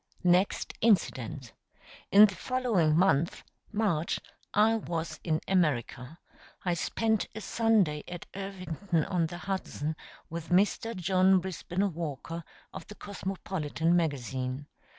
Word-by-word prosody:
Next 180 +2 +2
incident. 150 - +1 0.6
In 205 +2 +10
the 200 - -1
following 215 -13 +1
month 170 -3 +2 0.3
March 195 -7 0 0.3
I 215 +2 +4
was 170 -7 -3
in 160 -2 0
America. 150 -5 0 0.5
I 175 - +2
spent 220 +5 0
a 220 - -5
Sunday 205 -9 +2
at 175 -1 -7
Irvington 185 -3 -2
on 175 -4 0
the 175 +2 -7
Hudson 175 -5 -3 0.3
with 165 0 -6
Mr. 205 +5 +2
John 185 +1 +4
Brisben 185 +1 -2
Walker, 165 +1 -5 0.3
of - - -8
the 210 - -10
Cosmopolitan 185 -5 -2
magazine. 135 -4 -1
175 Hz, 115 wpm, -29 LUFS, 155-195 Hz, 0.6 s, In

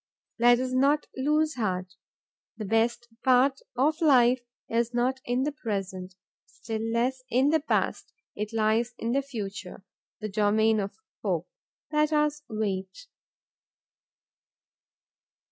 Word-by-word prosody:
Let 240 +1 +6
us 255 0 -2
not 280 +4 +3
lose 305 +3 +1
heart. 185 -4 -2 0.6
The 215 - -4
best 225 +3 +1 0.2
part 265 +1 +4 0.2
of 300 +6 +1
life 255 -5 +5 0.3
is 235 +1 0
not 255 +2 +1
in 245 +2 0
the 295 - 0
present, 195 -8 -4 0.3
still 220 -1 -5
less 235 +3 0
in 260 +3 +3
the 320 - +4
past; 300 - -1 0.2
it 210 +1 -4
lies 225 +2 +1
in 230 - -2
the 275 +3 +2
future, 205 -7 -7 0.3
the 215 - -3
domain 215 +1 +2
of 200 0 -3 0.3
hope. - - -1 0.4
Let 300 0 +2
us 300 0 +1
wait. 200 - -3
240 Hz, 125 wpm, -27 LUFS, 215-265 Hz, 0.6 s, Let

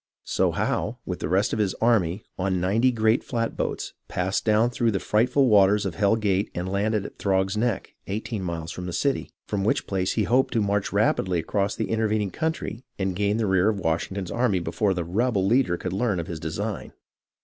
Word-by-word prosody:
So - - +1
Howe, - - -1
with - - -4
the - - -3
rest 100 +7 +2
of 110 - -1
his 100 -3 +1
army, 105 -5 +1
on 95 -1 0
ninety 110 +8 +2
great 110 0 +2
flatboats, 115 -2 -2
passed 90 +2 -1
down 110 +2 +3
through 120 -1 +1
the 100 -3 0
frightful 125 +8 +2
waters 100 -1 +5
of 95 - -2
Hell 100 +3 +3
Gate 100 -2 0
and 90 +1 -3
landed 100 +2 0
at - - -10
Throg's 95 0 +1
Neck, 115 -1 -1
eighteen 105 +1 -3
miles 85 -2 -4
from 90 0 -6
the 90 - -4
city, 140 +9 0 0.2
from 100 -2 -2
which 105 - +1
place 95 -1 -1
he 110 - +1
hoped 125 +6 +2
to 115 - +3
march 100 0 0
rapidly 100 -3 +1
across 100 +4 -1
the - - -3
intervening 110 -3 0
country 160 -7 -3
and 95 -2 -1
gain 100 +2 +1
the 115 - 0
rear 95 +1 +3
of 105 -2 -1
Washington's 90 +2 -2
army 120 -5 +1
before 90 +4 0
the 90 - -1
"rebel" 100 +3 0
leader 115 -4 +2
could 90 +1 -4
learn 100 -2 0
of 85 - -3
his 85 -3 -6
design. 80 +1 -4
100 Hz, 205 wpm, -25 LUFS, 95-110 Hz, 0.2 s, waters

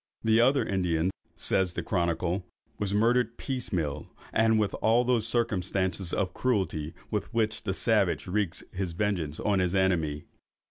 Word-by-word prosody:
"The 110 +1 +4
other 135 +3 +3
Indian," 90 -2 0 0.2
says 95 -2 +1
the - - -2
chronicle, 85 0 0 0.4
"was 100 -2 0
murdered 115 +2 +2
piecemeal, 85 - -3 0.3
and 110 0 +4
with 105 -2 +1
all 115 +2 +4
those 120 -3 +2
circumstances 95 -6 0
of 90 -2 -1
cruelty 90 -11 -1 0.2
with 105 - -2
which 110 -1 0
the - - 0
savage - - +2
wreaks 95 -2 -1
his 95 -2 -3
vengeance 85 -6 -1
on 100 -2 +1
his 90 0 +1
enemy." 80 -6 +1
95 Hz, 145 wpm, -28 LUFS, 90-110 Hz, 0.4 s, The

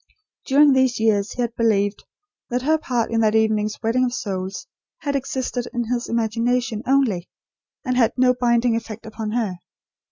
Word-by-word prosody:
During 285 +1 +6
these 260 -2 +2
years 215 -1 +1
he 250 - -3
had 235 0 -3
believed, 205 -3 +1 0.5
that 245 +1 -1
her 315 +3 +2
part 245 -6 -1
in 230 - +1
that 215 0 +2
evening's 215 -1 +1
wedding 235 +3 +2
of 245 -1 -2
souls 190 - -4 0.4
had 285 -2 -2
existed 260 -2 -2
in 240 0 -1
his 240 0 -3
imagination, 230 +1 0
only; 250 -10 +1 0.6
and 255 -1 0
had 235 -3 +3
no 250 0 +4
binding 240 -1 +2
effect 225 0 -6
upon 220 0 -5
her. 210 -7 -2
235 Hz, 165 wpm, -22 LUFS, 220-250 Hz, 0.6 s, During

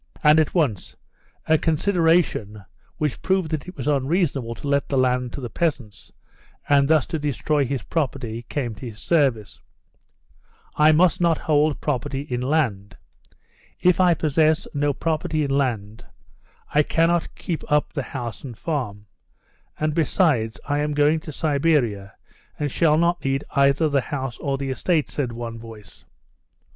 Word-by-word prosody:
And 150 +1 +6
at 155 - 0
once 135 - 0 0.5
a 160 -1 +3
consideration, 160 - +1 0.3
which 150 -4 -2
proved 185 -4 0
that 155 +1 -3
it 180 - -10
was 130 - -5
unreasonable 140 -4 0
to 145 - -8
let 140 0 +1
the 140 - 0
land 125 -1 +1
to 140 - -6
the 120 - -5
peasants, 125 - -3 0.6
and 140 -1 +4
thus 155 -2 +3
to 160 - -3
destroy 145 0 0
his 135 -3 -3
property, 130 -7 -3
came 125 -6 -2
to 110 +4 -8
his 110 -2 -9
service. 135 - 0 1.1
"I 150 +1 +5
must 170 +2 +3
not 170 -2 +3
hold 150 -1 +1
property 140 -1 -2
in 125 -4 -4
land. 125 -8 -1 0.8
If 180 -1 +3
I 180 -2 +5
possess 155 +2 +1
no 145 0 +1
property 155 +1 -1
in 140 - -2
land, 115 -6 -1 0.7
I 150 - +5
cannot 165 +2 +1
keep 165 -3 -4
up 150 0 +2
the 140 - -2
house 120 -5 -6
and 125 -5 -8
farm. 115 -11 -4 0.7
And, 155 0 0
besides, 145 - +1
I 145 0 0
am 150 0 -1
going 150 +2 +3
to 155 - -9
Siberia, 140 - 0 0.4
and 145 -2 -2
shall 155 +1 +3
not 170 +1 +1
need 135 +1 0
either 140 +3 +3
the 140 -2 +1
house 130 -2 -5
or 140 -1 -2
the 135 -1 -3
estate," 155 +4 0
said 130 -5 -2
one 115 -1 -6
voice. 110 -4 -13
145 Hz, 155 wpm, -23 LUFS, 125-155 Hz, 1.1 s, And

